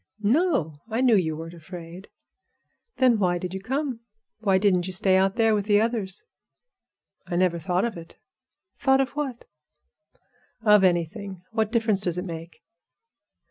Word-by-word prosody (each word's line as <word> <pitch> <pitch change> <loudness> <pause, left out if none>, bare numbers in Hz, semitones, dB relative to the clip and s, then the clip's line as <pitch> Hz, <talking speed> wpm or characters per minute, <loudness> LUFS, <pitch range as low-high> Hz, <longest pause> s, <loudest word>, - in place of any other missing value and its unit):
"No; 215 - +1
I 225 +3 -1
knew 250 -4 +5
you 160 -5 0
weren't 165 +1 -8
afraid." 170 +2 -10 0.9
"Then 250 -4 +4
why 180 -3 +2
did 180 +1 -5
you 190 - -5
come? 265 +2 -2 0.4
Why 195 -3 +2
didn't 190 -3 +2
you 185 - -5
stay 185 +1 +2
out 190 +1 +2
there 225 -2 +3
with 205 -2 0
the 205 -1 +5
others?" 215 -4 -2 1.0
"I 175 - -3
never 175 -1 +2
thought 180 +4 0
of 235 - -3
it." 165 0 -12 0.6
"Thought 265 -1 +3
of 270 - -2
what?" 275 -5 -4 1.2
"Of 210 -3 +6
anything. 180 +1 -1
What 220 -1 0
difference 225 -4 +1
does 175 -3 -1
it 180 - -3
make?" 165 -1 -8
195 Hz, 155 wpm, -25 LUFS, 175-225 Hz, 1.2 s, Of